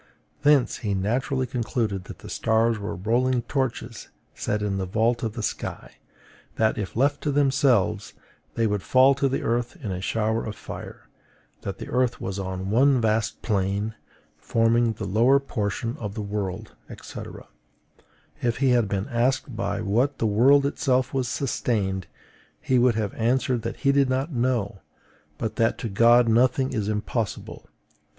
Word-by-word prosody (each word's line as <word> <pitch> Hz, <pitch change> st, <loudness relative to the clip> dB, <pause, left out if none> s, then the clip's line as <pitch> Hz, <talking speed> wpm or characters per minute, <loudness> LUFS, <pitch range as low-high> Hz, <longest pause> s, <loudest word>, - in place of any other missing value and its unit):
Thence 145 Hz, -3 st, +3 dB
he 100 Hz, -3 st, -2 dB
naturally 125 Hz, +7 st, 0 dB
concluded 115 Hz, -5 st, -2 dB
that -, -, -9 dB
the -, -, -7 dB
stars 110 Hz, 0 st, +1 dB
were 100 Hz, -, -4 dB
rolling 120 Hz, +5 st, +1 dB
torches 120 Hz, -4 st, -3 dB, 0.3 s
set 105 Hz, 0 st, -2 dB
in 100 Hz, -2 st, -1 dB
the 95 Hz, -, -3 dB
vault 115 Hz, +5 st, +1 dB
of 110 Hz, -3 st, -2 dB
the 115 Hz, -, -5 dB
sky; -, -, -5 dB, 0.6 s
that, 110 Hz, 0 st, +2 dB
if 100 Hz, -4 st, -5 dB
left 140 Hz, +4 st, +1 dB
to 150 Hz, -, -1 dB
themselves, 135 Hz, -7 st, +2 dB, 0.4 s
they 115 Hz, -, +1 dB
would 105 Hz, -2 st, 0 dB
fall 130 Hz, +5 st, +5 dB
to 140 Hz, 0 st, 0 dB
the 135 Hz, -, -2 dB
earth 120 Hz, +1 st, -1 dB
in 105 Hz, -, -4 dB
a 90 Hz, 0 st, -4 dB
shower 110 Hz, +2 st, 0 dB
of 110 Hz, -, -5 dB
fire; -, -, -9 dB, 0.5 s
that -, -, -5 dB
the -, -, -7 dB
earth 125 Hz, -1 st, +1 dB
was 95 Hz, +1 st, -4 dB
one 100 Hz, +9 st, +2 dB
vast 110 Hz, -1 st, 0 dB
plain, 100 Hz, +1 st, -1 dB, 0.4 s
forming 115 Hz, 0 st, +2 dB
the -, -, -6 dB
lower 120 Hz, +8 st, +4 dB
portion 115 Hz, -2 st, -3 dB
of 105 Hz, -7 st, -6 dB
the 110 Hz, -, -3 dB
world, 100 Hz, 0 st, -4 dB, 0.3 s
&c. -, -, -8 dB, 1.2 s
If 120 Hz, -1 st, 0 dB
he 135 Hz, -1 st, +2 dB
had 120 Hz, -3 st, +3 dB
been 100 Hz, +1 st, -2 dB
asked 130 Hz, 0 st, 0 dB
by 115 Hz, 0 st, -2 dB
what 120 Hz, +7 st, +1 dB
the -, -, -1 dB
world 130 Hz, +7 st, +5 dB
itself 130 Hz, -3 st, 0 dB
was 130 Hz, -2 st, 0 dB
sustained, 100 Hz, -, -1 dB, 0.5 s
he 130 Hz, -1 st, +1 dB
would 120 Hz, -2 st, +4 dB
have 105 Hz, -3 st, -2 dB
answered 125 Hz, +1 st, +1 dB
that 115 Hz, -, -5 dB
he 140 Hz, -, +4 dB
did 140 Hz, -1 st, +3 dB
not 135 Hz, +5 st, -1 dB
know, 120 Hz, -5 st, -1 dB, 0.6 s
but 110 Hz, -, -4 dB
that 115 Hz, -2 st, +2 dB
to 115 Hz, -, -4 dB
God 115 Hz, +4 st, +5 dB
nothing 130 Hz, +3 st, +2 dB
is 105 Hz, -4 st, -1 dB
impossible. 110 Hz, 0 st, -3 dB
115 Hz, 160 wpm, -25 LUFS, 105-130 Hz, 1.2 s, fall